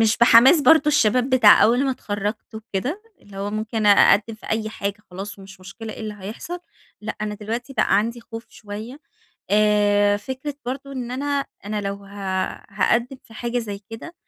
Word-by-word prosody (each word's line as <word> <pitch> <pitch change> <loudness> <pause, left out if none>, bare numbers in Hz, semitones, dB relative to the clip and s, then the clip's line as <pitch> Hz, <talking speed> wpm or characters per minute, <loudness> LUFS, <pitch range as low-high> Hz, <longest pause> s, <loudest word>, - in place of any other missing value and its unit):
مش 220 -1 +3
بحماس 240 +6 +7
برضو 310 0 +5
الشباب 255 -3 +2
بتاع 235 -5 +7
أول 245 +5 +4
ما 270 - +1
اتخرجت 210 -2 -4
وكده، 225 - -4 0.2
اللي 200 -1 -14
هو 200 +1 -3
ممكن 215 0 -2
أقدم 205 +2 +5
في 215 - -15
أي 220 0 -1
حاجة 200 -2 -4
خلاص 195 +3 -7
ومش 195 -1 -13
مشكلة 215 +4 -9
إيه - - -10
اللي 215 -1 -5
هيحصل، 225 - -6 0.4
لأ، 215 - -5
أنا 210 0 -3
دلوقتي 230 +5 -5
بقى 225 - +2
عندي 230 +3 -2
خوف 230 0 -9
شوية 220 +6 -9 0.5
آآ، 205 -1 +3
فكرة 260 +7 -6
برضو 275 +2 -5
إن 250 -3 -5
أنا، 280 +2 -2 0.2
أنا 210 0 -2
لو 200 0 -3
ه - - -15 0.6
هاقدم 235 +6 +1
في 225 - -17
حاجة 240 +2 -2
زي 205 -4 -5
كده 235 +10 -9
220 Hz, 175 wpm, -22 LUFS, 205-250 Hz, 0.6 s, بحماس